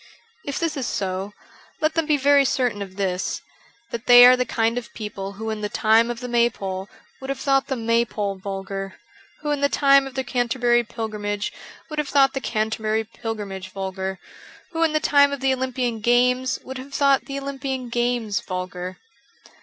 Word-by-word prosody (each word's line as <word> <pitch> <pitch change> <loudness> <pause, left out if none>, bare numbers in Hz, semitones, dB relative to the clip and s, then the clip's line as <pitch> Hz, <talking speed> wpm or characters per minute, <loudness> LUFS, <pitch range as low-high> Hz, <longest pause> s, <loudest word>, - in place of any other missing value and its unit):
If 280 - -2
this 330 -2 -1
is 265 -4 -2
so, 190 +1 -3 0.5
let 310 0 +1
them 325 -2 0
be 300 -2 +3
very 280 +1 +5
certain 250 -5 0
of 190 -2 -7
this: 190 -2 -1 0.5
that 235 0 -6
they 245 0 +10
are 250 +1 +8
the 250 0 0
kind 230 +1 +1
of 235 - -13
people 200 -2 -5
who 220 +2 -4
in 215 -1 -4
the 210 - -2
time 225 +3 +3
of 240 0 -4
the 250 - -4
maypole 205 -6 0 0.3
would 265 - -8
have 275 - -2
thought 270 -1 +2
the 265 - -1
may 230 0 +2
pole 205 -4 -3
vulgar; 195 0 -5 0.5
who 295 0 -2
in 290 -1 -1
the 280 - +3
time 275 -1 +4
of 270 - -11
the 265 - -1
Canterbury 240 -1 +1
pilgrimage 210 -2 -4 0.4
would 305 - -3
have 300 - -2
thought 270 -1 +4
the 270 - -3
Canterbury 220 -1 -1
pilgrimage 205 -4 -6
vulgar; 190 0 -4 0.5
who 330 -1 -3
in 325 -2 +3
the 310 - +3
time 285 -1 +4
of 280 - -3
the 265 0 +2
Olympian 255 -3 -2
Games 250 +3 +2
would 260 0 -7
have 275 +2 -9
thought 275 -3 +3
the 275 +1 -4
Olympian 270 -2 -4
Games 240 -4 0
vulgar. 185 0 -5
240 Hz, 190 wpm, -23 LUFS, 205-270 Hz, 0.5 s, they